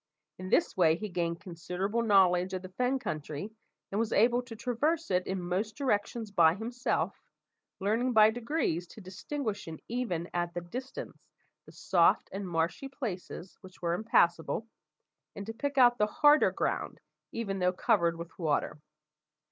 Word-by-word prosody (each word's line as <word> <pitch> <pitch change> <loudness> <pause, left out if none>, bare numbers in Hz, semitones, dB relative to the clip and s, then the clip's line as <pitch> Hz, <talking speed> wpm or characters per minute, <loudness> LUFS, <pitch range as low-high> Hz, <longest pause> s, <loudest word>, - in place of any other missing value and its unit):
In 185 0 -6
this - - +2
way 165 -4 +4
he 215 +4 -5
gained 170 -2 -2
considerable 185 +4 -3
knowledge 190 -4 +4
of 185 - -5
the 185 - -8
fen 250 +7 0
country, 155 - -5 0.4
and 200 - -1
was 225 -1 0
able 240 +3 +4
to 245 -2 -10
traverse 285 +6 -1
it 180 0 +1
in 190 0 -2
most 185 +5 -2
directions 225 -4 -1
by 170 -4 +5
himself, 240 +4 -2 0.6
learning 225 +6 +1
by 215 -2 +6
degrees 230 - -1
to - - -13
distinguish 205 - -5 0.2
even 210 -9 -2
at 175 0 -2
a - - -1
distance 255 +10 -8 0.4
the - - -12
soft - - +2
and 195 -1 -5
marshy 165 +10 -1
places 195 -8 -6
which 185 -2 -15
were 170 0 +1
impassable, 175 -1 +2 0.7
and 200 - -6
to 225 - -5
pick 285 +4 -3
out 245 -2 +6
the 210 - +3
harder 295 +7 +5
ground, - - -2 0.3
even 195 -4 -3
though 180 0 +3
covered 175 -4 +2
with 170 +2 -9
water. 150 -2 -1
200 Hz, 155 wpm, -30 LUFS, 175-235 Hz, 0.7 s, by